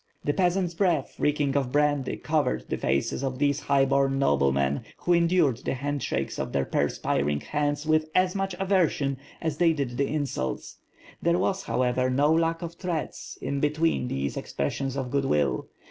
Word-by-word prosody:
The 145 - +1
peasants' 180 0 +1
breath, 165 -5 +1
reeking 145 -2 +1
of 135 -3 0
brandy, 145 -2 +1
covered 135 - 0
the - - -1
faces 70 - 0
of 130 -1 -2
these 145 +1 +1
highborn 135 -1 +2
noblemen, 70 - +2 0.2
who 175 - +1
endured 170 -6 +3
the 130 - -3
handshakes 145 +1 -2
of - - -3
their 70 -1 +1
perspiring 70 0 0
hands 145 0 -1
with 155 0 +2
as 185 0 +3
much 195 -2 -2
aversion 170 -8 +1 0.3
as 160 -3 -1
they 170 -2 +5
did 135 -5 -3
the 140 - +1
insults. 140 - -3 0.4
There 170 +1 +2
was, 190 +1 0
however, 125 +2 +1
no 145 +4 +3
lack 165 +1 +1
of 170 0 -5
threats, 170 -3 -4
in 140 +1 -1
be 150 - +2
tween 155 -4 0
these 70 - -2
expressions 135 - -3
of 130 -2 -3
good 140 -1 +1
will. 75 - +1
145 Hz, 170 wpm, -26 LUFS, 125-165 Hz, 0.4 s, they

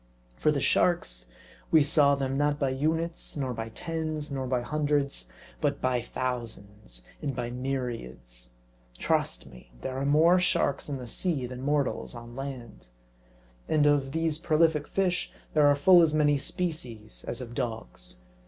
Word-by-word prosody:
For 150 - +2
the 145 - 0
sharks, 95 - +1 0.4
we 155 -2 +6
saw 140 -1 +4
them, 135 -1 -2
not 145 +1 +1
by 140 -3 +1
units, 160 +5 -2
nor 130 -3 -1
by 115 -1 -5
tens, 155 +2 -4
nor 135 -2 -2
by 125 -1 0
hundreds; 145 - -1 0.3
but - - +1
by 125 -1 +1
thousands 110 - -5 0.2
and 140 -3 -2
by 120 0 -3
myriads. 115 - -5 0.5
Trust - - 0
me, 60 -2 -15
there 130 - -4
are 135 - -1
more 165 +5 +5
sharks 150 -5 +1
in 140 - -2
the 125 - -7
sea 145 +2 -1
than 125 0 -7
mortals 140 -2 -1
on 120 0 -10
land. 130 - -7 0.8
And 150 -1 +3
of 145 -2 +3
these 160 0 0
prolific 155 -2 +2
fish 185 -2 0 0.2
there 150 -2 +5
are 145 - +5
full 175 +4 +7
as 155 -2 +3
many 145 -2 +3
species 125 -11 -4
as 120 - -3
of 120 -2 -7
dogs. 110 - -5
135 Hz, 155 wpm, -28 LUFS, 120-150 Hz, 0.8 s, full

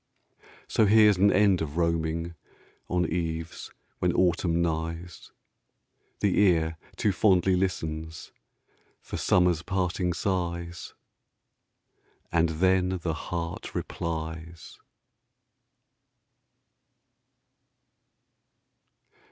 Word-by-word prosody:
So 110 - +3
here's 105 -1 +6
an 100 +2 +5
end 100 -3 +3
of 80 0 -4
roaming 85 0 -1 0.6
On 90 0 +1
eves 80 0 -4 0.3
when - - +2
autumn 85 -1 +2
nighs: 85 +1 -3 0.9
The 100 -3 +2
ear 80 -5 +2 0.2
too 105 - +1
fondly 95 -1 +3
listens 80 -4 -3 0.7
For - - -7
summer's 90 -3 +3
parting 90 -1 -1
sighs, 85 -1 -3 1.4
And 85 0 +2
then 95 +2 +1
the 80 - -1
heart 85 +2 -5
replies. 80 0 -5
85 Hz, 80 wpm, -27 LUFS, 80-95 Hz, 1.4 s, here's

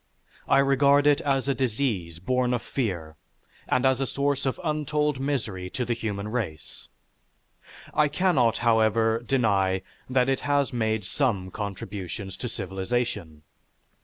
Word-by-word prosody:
I - - +4
regard 140 +1 +4
it 145 -1 +4
as 135 -2 0
a 140 - +3
disease 110 - -1
born 125 +6 +1
of 120 - -4
fear 85 - -3 0.5
and 130 +1 +2
as 130 0 +3
a 135 - 0
source 140 +1 0
of 130 - -2
untold 150 -2 0
misery 110 -10 -2
to 125 - -3
the 120 - 0
human 105 -3 -4
race. 105 -10 -5 1.0
I 150 - +4
cannot, 145 -7 +2
however, 110 0 +3
deny 100 -7 +1 0.3
that 130 -1 +3
it 135 -1 +1
has 145 -2 +1
made 110 -3 0
some 100 -6 -1
contributions 100 -1 -5
to 125 - -4
civilization. 95 -5 -3
120 Hz, 135 wpm, -26 LUFS, 100-135 Hz, 1.0 s, I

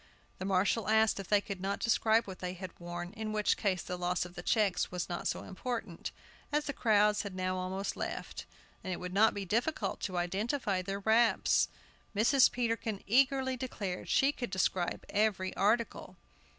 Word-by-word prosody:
The 185 - -4
marshal 200 +3 +1
asked 220 -1 +4
if 195 - -6
they 205 -1 +4
could 200 -3 -6
not 195 +1 -1
describe 225 0 +3
what 190 -2 -8
they 180 0 -3
had 185 0 -7
worn, 175 +1 -6
in 220 -1 -4
which 210 -1 +2
case 190 -4 0
the 180 - -4
loss 180 0 0
of 175 - -10
the 175 - -7
checks 195 -1 +1
was 180 -1 -3
not 175 -1 -3
so - - -2
important, 200 -3 -5 0.4
as 295 0 +1
the 285 - -2
crowds 210 -3 +3
had 200 -3 -6
now 185 0 -1
almost 185 +2 -3
left, - - -5 0.4
and 185 - -4
it 180 - -3
would 180 0 -6
not 215 +3 +4
be 200 -1 -3
difficult 235 - -1
to 185 -3 -3
identify 195 +3 -1
their 195 +2 -4
wraps. 225 +3 +3 0.5
Mrs. 250 +6 +5
Peterkin 230 -4 -2
eagerly 260 +3 +3
declared 210 -8 -4
she 275 +1 +4
could 245 -4 -5
describe 185 -1 -1
every 205 -3 0
article. 225 +4 0
200 Hz, 180 wpm, -32 LUFS, 185-225 Hz, 0.5 s, Mrs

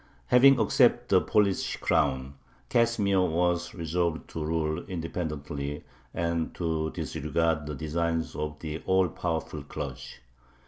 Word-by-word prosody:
Having 135 +2 +7
accepted 110 - +3
the - - +5
Polish 100 -3 +1
crown, 70 -4 +1 0.4
Casimir 105 -5 +2
was 90 0 0
resolved 85 -1 -1
to 80 - -4
rule 80 +1 -1
independently 75 -5 -4 0.3
and 85 -1 -2
to 80 -2 -1
disregard 80 +1 -1
the 75 - -4
designs 80 +2 -2
of 75 0 -4
the 80 0 -5
all 95 -1 +3
powerful 80 -3 -3
clergy. 70 -2 -7
80 Hz, 120 wpm, -28 LUFS, 75-90 Hz, 0.4 s, Having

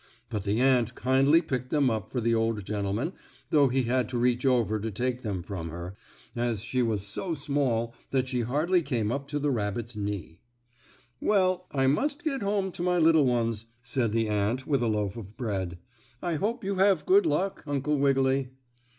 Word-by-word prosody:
But 105 -4 -3
the 105 +3 +1
ant 125 -2 +3
kindly 135 +6 +4
picked 125 -4 -3
them 145 -5 +2
up 110 -1 -3
for 125 - -2
the 115 0 +1
old 115 -3 0
gentleman 105 - -2 0.4
though 145 -3 +5
he 130 +1 +1
had 125 -1 0
to 125 - -2
reach 125 +2 +2
over 115 -4 +2
to 110 +2 -3
take 125 +4 -2
them 100 -6 -3
from 85 -3 -5
her, 85 +3 -7 0.4
as 120 -3 -1
she 125 +2 0
was 110 -4 0
so 165 - -2
small 135 -6 0 0.2
that 130 -1 0
she 125 -2 -1
hardly 155 +10 +1
came 120 -8 -1
up 140 +2 -3
to 145 +1 -3
the 145 0 0
rabbit's 115 0 -2
knee. 100 -5 -4 0.8
"Well, 185 -3 +2
I 135 -2 0
must 285 - +1
get 275 -6 -1
home 200 -1 0
to 170 - -7
my 180 0 +2
little 160 -4 +5
ones," 115 -2 0 0.2
said 120 -3 0
the 115 0 +1
ant 105 +5 0
with 140 -4 +1
a 120 - +1
loaf 105 -1 -1
of 105 -1 -10
bread. 95 -8 -3 0.4
"I 175 +3 -2
hope 220 +9 -1
you 195 0 -2
have 195 0 +3
good 380 -1 +5
luck, 195 - -1
Uncle 145 +1 0
Wiggily." 135 -1 +2
125 Hz, 195 wpm, -28 LUFS, 110-150 Hz, 0.8 s, though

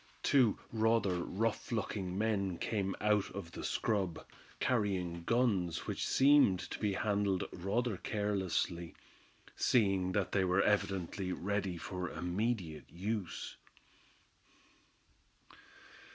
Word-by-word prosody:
Two 130 -7 +4
rather 110 -5 +2
rough 110 +5 -2
looking 100 -5 -2
men 100 -4 0
came 100 -1 -1
out 105 -1 +2
of 95 -4 -6
the - - -7
scrub, 95 -6 -1 0.3
carrying 95 -8 0
guns 100 -9 +1
which - - -2
seemed 135 -9 +5
to - - -4
be 105 -2 0
handled 100 -2 0
rather 105 +4 -1
carelessly, 95 -5 -1 0.6
seeing 95 -5 +2
that 100 -1 0
they 100 - +2
were 90 +1 +3
evidently 95 -2 0
ready 100 -1 -2
for 90 +2 -4
immediate 90 -2 -2
use. 100 +1 -4
100 Hz, 105 wpm, -34 LUFS, 90-110 Hz, 0.6 s, seemed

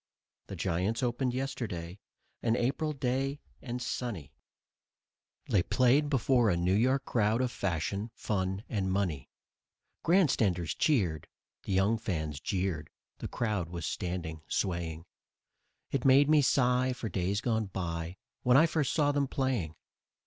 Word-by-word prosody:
The - - -6
Giants 95 +7 -1
opened 125 +1 0
yesterday, 110 -9 -4 0.4
an 115 -1 +2
April 135 +6 0
day 135 +1 -1 0.2
and 125 -1 -4
sunny; 115 - -4 1.1
They 100 - +3
played 130 - +3
before 125 -3 +3
a 85 - +2
New 90 +2 +1
York 130 +6 +2
crowd 110 0 +1
of 125 -1 0
fashion, 100 +3 -2
fun 95 -1 -2
and 95 -4 -1
money. 90 -9 -1 0.7
Grandstanders 110 - +2
cheered, 95 - +1 0.4
the 100 - -2
young 100 +4 +3
fans 80 - -3
jeered; 90 -4 -2 0.3
the - - -4
crowd 105 -8 -2
was 85 -2 -5
standing, 85 -3 -4
swaying, 85 -3 -2 0.9
It 135 - -1
made 135 +1 +6
me 155 -1 +6
sigh 130 -1 +3
for 125 - -5
days 100 0 -1
gone 110 -2 0
by, 85 -1 -4 0.2
when 125 +1 +5
first 155 -4 0
I - - -3
saw 145 -3 +3
them 140 -1 +1
playing. 125 - -1
110 Hz, 135 wpm, -30 LUFS, 90-130 Hz, 1.1 s, made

